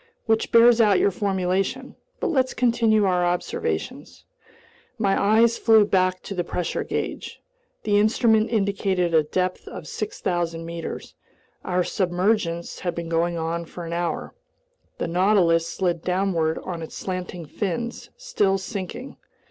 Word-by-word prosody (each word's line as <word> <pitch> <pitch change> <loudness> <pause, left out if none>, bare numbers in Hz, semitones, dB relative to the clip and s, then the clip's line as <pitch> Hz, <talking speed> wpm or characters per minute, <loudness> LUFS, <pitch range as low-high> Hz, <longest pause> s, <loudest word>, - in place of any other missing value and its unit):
Which 220 0 +1
bears 235 0 +6
out 205 -4 +5
your 200 - +3
formulation. 195 +6 -1 0.2
But - - -1
let's 260 -4 +1
continue 230 -4 +3
our 180 -2 +2
observations." 175 0 -3 0.7
My 200 -3 +2
eyes 225 +3 +3
flew 220 -2 +5
back 185 -2 +1
to - - -6
the 180 -2 -1
pressure 175 0 -3
gauge. - - -4 0.4
The 205 -1 +3
instrument 220 0 +3
indicated 195 -5 0
a 160 - +6
depth 180 +4 -2
of - - -8
6,000 175 - -3
meters. 170 0 -6 0.5
Our 180 -1 0
submergence 180 -1 -1
had 175 -2 -3
been 170 -1 -5
going 170 +1 0
on 165 +1 -2
for 170 +1 -8
an 165 - -5
hour. 170 0 -3 0.6
The - - -2
Nautilus 175 -2 +3
slid 175 -3 -1
downward 180 -4 0
on 175 -3 -5
its 160 - -8
slanting 180 -2 -5
fins, 210 +9 -4
still 485 - +1
sinking. 200 +6 -6
185 Hz, 140 wpm, -24 LUFS, 170-215 Hz, 0.7 s, bears